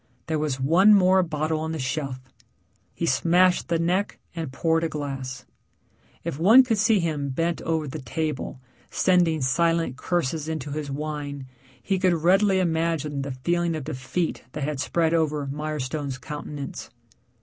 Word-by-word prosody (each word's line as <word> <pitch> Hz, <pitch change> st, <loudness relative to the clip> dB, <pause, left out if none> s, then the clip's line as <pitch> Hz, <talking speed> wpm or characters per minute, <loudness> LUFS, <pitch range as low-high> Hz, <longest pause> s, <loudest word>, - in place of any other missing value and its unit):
There 160 Hz, -1 st, -1 dB
was 150 Hz, -3 st, -1 dB
one 180 Hz, +10 st, +6 dB
more 190 Hz, -1 st, +5 dB
bottle 155 Hz, -2 st, -1 dB
on 160 Hz, +1 st, -3 dB
the -, -, -3 dB
shelf; 130 Hz, -1 st, -3 dB, 0.8 s
he 170 Hz, -, -2 dB
smashed 175 Hz, +6 st, +3 dB
the 170 Hz, 0 st, +1 dB
neck 180 Hz, +5 st, 0 dB, 0.2 s
and 160 Hz, -5 st, -4 dB
poured 165 Hz, +4 st, +1 dB
a 165 Hz, -, 0 dB
glass. 135 Hz, -4 st, -5 dB, 0.8 s
If 140 Hz, -, -4 dB
one 220 Hz, +10 st, +8 dB
could 225 Hz, -4 st, 0 dB
see 220 Hz, 0 st, +4 dB
him 155 Hz, -5 st, -1 dB
bent 165 Hz, +5 st, -1 dB
over 160 Hz, -2 st, -1 dB
the 150 Hz, +2 st, -6 dB
table 150 Hz, +1 st, -3 dB, 0.3 s
sending 175 Hz, -4 st, +2 dB
silent 165 Hz, +1 st, +1 dB
curses 160 Hz, -1 st, -1 dB
into 155 Hz, -2 st, -4 dB
his 150 Hz, 0 st, -4 dB
wine, 145 Hz, -1 st, -4 dB, 0.4 s
he 195 Hz, -2 st, 0 dB
could 185 Hz, -1 st, +3 dB
readily 190 Hz, +4 st, +3 dB
imagine 160 Hz, -4 st, 0 dB
the 140 Hz, -, -4 dB
feeling 170 Hz, -1 st, +1 dB
of 155 Hz, -, -4 dB
defeat 155 Hz, +4 st, -3 dB
that 150 Hz, -, -4 dB
had 145 Hz, -1 st, -2 dB
spread 165 Hz, +3 st, +1 dB
over 155 Hz, -3 st, +1 dB
Mirestone's 145 Hz, -1 st, -3 dB
countenance. 145 Hz, -1 st, -7 dB
155 Hz, 155 wpm, -25 LUFS, 145-170 Hz, 0.8 s, one